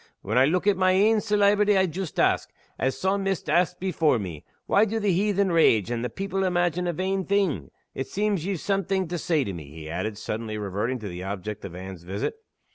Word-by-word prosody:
When 105 Hz, +3 st, -2 dB
I 130 Hz, +1 st, +6 dB
look 180 Hz, +6 st, +1 dB
at 205 Hz, -2 st, +3 dB
my 185 Hz, 0 st, +4 dB
ain 210 Hz, +4 st, +4 dB
celeebrity 205 Hz, -1 st, +3 dB
I 190 Hz, -, +4 dB
joost 180 Hz, -1 st, -4 dB
ask, -, -, +2 dB, 0.3 s
as 130 Hz, 0 st, 0 dB
the 190 Hz, -, -2 dB
Psawmist 195 Hz, -3 st, 0 dB
asked 175 Hz, +2 st, +2 dB
before 165 Hz, -7 st, +2 dB
me, 90 Hz, -8 st, -6 dB, 0.2 s
'Why 205 Hz, -, +4 dB
do 220 Hz, +1 st, 0 dB
the 205 Hz, -2 st, +1 dB
heathen 200 Hz, 0 st, +2 dB
rage, 120 Hz, -, +4 dB
and 120 Hz, -1 st, -2 dB
the 125 Hz, -, -1 dB
people 195 Hz, 0 st, -2 dB
imagine 175 Hz, -1 st, +1 dB
a -, -, +1 dB
vain 190 Hz, +3 st, -1 dB
thing?' 185 Hz, -, 0 dB, 0.2 s
It 135 Hz, -, -4 dB
seems 205 Hz, -4 st, 0 dB
ye've 190 Hz, -1 st, -2 dB
something 195 Hz, -1 st, 0 dB
to 175 Hz, -1 st, -2 dB
say 160 Hz, -3 st, +1 dB
to 100 Hz, -, -4 dB
me," 80 Hz, -4 st, -7 dB
he 80 Hz, +1 st, -9 dB
added, 105 Hz, +4 st, -3 dB
suddenly 110 Hz, 0 st, -4 dB
reverting 105 Hz, +5 st, -2 dB
to 105 Hz, -, -5 dB
the 90 Hz, -1 st, -6 dB
object 100 Hz, +2 st, -5 dB
of 90 Hz, -3 st, -8 dB
Anne's 95 Hz, -1 st, -8 dB
visit. 95 Hz, -, -3 dB
175 Hz, 215 wpm, -26 LUFS, -, 0.3 s, I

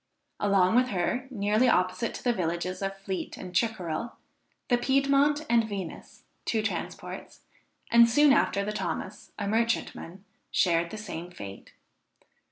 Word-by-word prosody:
Along 195 Hz, -1 st, +3 dB
with 250 Hz, +1 st, +4 dB
her, 245 Hz, +6 st, -1 dB
nearly 215 Hz, +1 st, +2 dB
opposite 185 Hz, +3 st, +1 dB
to -, -, -8 dB
the 245 Hz, -, +2 dB
villages 180 Hz, -1 st, -2 dB
of 195 Hz, 0 st, -3 dB
Fleet 195 Hz, -1 st, -5 dB
and 180 Hz, -, -8 dB
Chickerell, 215 Hz, -1 st, -1 dB, 0.5 s
the 245 Hz, -1 st, +3 dB
Piedmont 275 Hz, +3 st, +2 dB
and 230 Hz, -1 st, +3 dB
Venus, 195 Hz, -5 st, -7 dB, 0.2 s
two 220 Hz, -2 st, 0 dB
transports, -, -, -5 dB, 0.5 s
and 235 Hz, 0 st, +7 dB
soon 290 Hz, +4 st, +6 dB
after 200 Hz, -7 st, +2 dB
the 210 Hz, -, -2 dB
Thomas, -, -, -4 dB
a 205 Hz, -, -3 dB
merchantman, 210 Hz, -4 st, -1 dB, 0.2 s
shared 170 Hz, -2 st, +2 dB
the 215 Hz, -, -7 dB
same 180 Hz, -5 st, -6 dB
fate. 100 Hz, -, -10 dB
210 Hz, 140 wpm, -28 LUFS, 185-235 Hz, 0.5 s, and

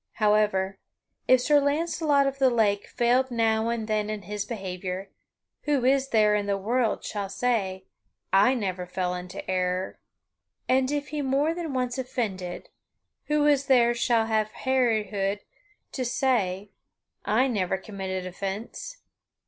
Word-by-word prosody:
However, 210 Hz, -3 st, +1 dB, 0.5 s
if 255 Hz, -1 st, +5 dB
Sir 290 Hz, +3 st, +4 dB
Launcelot 290 Hz, 0 st, +1 dB
of 275 Hz, 0 st, -2 dB
the 265 Hz, -1 st, +5 dB
Lake 210 Hz, -4 st, +1 dB
failed 250 Hz, +2 st, +2 dB
now 225 Hz, -1 st, +1 dB
and 230 Hz, -2 st, -2 dB
then 215 Hz, -1 st, 0 dB
in 215 Hz, -2 st, -4 dB
his 205 Hz, +2 st, -4 dB
behavior, 190 Hz, -3 st, -5 dB, 0.5 s
who 285 Hz, -4 st, +1 dB
is 270 Hz, +1 st, +3 dB
there 215 Hz, -3 st, +4 dB
in 205 Hz, -1 st, 0 dB
the 200 Hz, -1 st, +1 dB
world 225 Hz, +3 st, 0 dB
shall 200 Hz, -2 st, -4 dB
say, 195 Hz, -4 st, -1 dB, 0.5 s
"I 205 Hz, +7 st, +5 dB
never 185 Hz, -6 st, -3 dB
fell 180 Hz, 0 st, -2 dB
into 180 Hz, 0 st, -7 dB
error"? 185 Hz, 0 st, -1 dB, 0.7 s
And 260 Hz, 0 st, +2 dB
if 290 Hz, 0 st, -2 dB
he 300 Hz, -1 st, -3 dB
more 280 Hz, +4 st, +1 dB
than 335 Hz, -3 st, -4 dB
once 250 Hz, 0 st, -1 dB
offended, 195 Hz, -8 st, -4 dB, 0.6 s
who 300 Hz, 0 st, +2 dB
is 285 Hz, -2 st, +3 dB
there 240 Hz, -3 st, +5 dB
shall 235 Hz, -1 st, +2 dB
have 220 Hz, -1 st, 0 dB, 0.2 s
hardihood 215 Hz, -6 st, +1 dB, 0.5 s
to 260 Hz, -, -3 dB
say, 210 Hz, -6 st, 0 dB, 0.5 s
"I 245 Hz, +5 st, +2 dB
never 190 Hz, -6 st, 0 dB
committed 190 Hz, -2 st, -5 dB
offence"? 200 Hz, -, -6 dB
220 Hz, 140 wpm, -26 LUFS, 195-260 Hz, 0.7 s, if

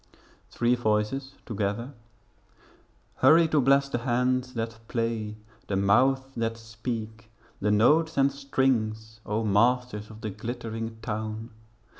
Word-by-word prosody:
Three 120 Hz, +1 st, +1 dB
Voices 120 Hz, +4 st, 0 dB
together 110 Hz, +4 st, -3 dB, 1.2 s
Hurry 165 Hz, +1 st, +6 dB
to 155 Hz, -2 st, +3 dB
bless 140 Hz, +2 st, +4 dB
the 120 Hz, -, -2 dB
hands 125 Hz, +1 st, 0 dB
that 115 Hz, -1 st, -4 dB
play, 115 Hz, -3 st, -2 dB, 0.3 s
The 100 Hz, -, -1 dB
mouths 120 Hz, +8 st, +4 dB
that 115 Hz, -1 st, -1 dB
speak, 115 Hz, 0 st, -6 dB, 0.3 s
the 105 Hz, -, 0 dB
notes 150 Hz, +10 st, +3 dB
and 135 Hz, 0 st, +4 dB
strings, 115 Hz, -6 st, -1 dB
O 105 Hz, +2 st, 0 dB
masters 110 Hz, +1 st, +2 dB
of 110 Hz, 0 st, -12 dB
the 110 Hz, -, -3 dB
glittering 115 Hz, +1 st, -5 dB
town! 110 Hz, 0 st, -4 dB
115 Hz, 120 wpm, -27 LUFS, 110-130 Hz, 1.2 s, Hurry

